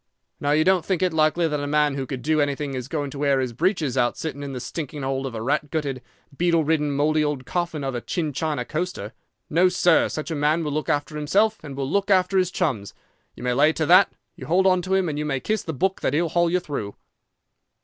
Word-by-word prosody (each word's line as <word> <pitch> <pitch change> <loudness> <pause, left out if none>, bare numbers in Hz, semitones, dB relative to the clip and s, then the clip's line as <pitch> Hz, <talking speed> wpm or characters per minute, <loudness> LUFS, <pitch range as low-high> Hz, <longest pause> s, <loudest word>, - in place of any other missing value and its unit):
_ - - -54 0.4
Now, 145 - -1
you 150 +2 +4
don't 185 -1 +3
think 185 +1 -1
it 180 -2 +1
likely 160 +2 +2
that 150 -2 -2
a 145 - -3
man 150 0 +2
who 135 -1 -4
could 130 -3 -5
do 155 0 +2
anything 145 0 -1
is 130 -1 -4
going 145 -2 -3
to 140 - -8
wear 140 -2 +2
his 130 -2 -2
breeches 160 - 0
out 120 -2 +1
sitting 145 -3 -5
in 140 -1 -5
the 130 - -5
stinking 145 +1 -5
hold 135 0 -2
of 120 - -7
a 110 - -4
rat 145 +3 0
gutted, 140 -4 -3 0.3
beetle 170 0 +2
ridden, 150 -1 +1
mouldy 150 +2 +2
old 145 -3 -2
coffin 170 -3 -2
of 135 -1 -2
a 120 - -3
China 150 -4 -2
coaster. 155 - -4 0.3
No, 175 +4 +3
sir, 180 -2 +3
such 155 +2 -5
a - - -1
man 150 +3 +1
will 150 - -2
look 150 -1 -2
after 145 +1 -1
himself 205 +9 +1
and 140 -3 -7
will 135 -1 -2
look 200 +7 0
after 190 0 +3
his 185 -1 +1
chums. 135 - -2 0.4
You - - -10
may 125 0 +1
lay 150 +5 +4
to 160 - -1
that! 180 +5 +6 0.2
You - - -9
hold 185 +3 +3
on 185 -1 +4
to 185 +2 0
him, 190 -2 +1
and 150 -2 -3
you - - -1
may 135 -3 -1
kiss 215 +7 -1
the 160 - -5
book 190 +7 -1
that - - 0
he'll 165 +2 +1
haul 175 0 +2
you 180 +2 +2
through." 140 - -5
150 Hz, 250 wpm, -23 LUFS, 140-175 Hz, 0.4 s, that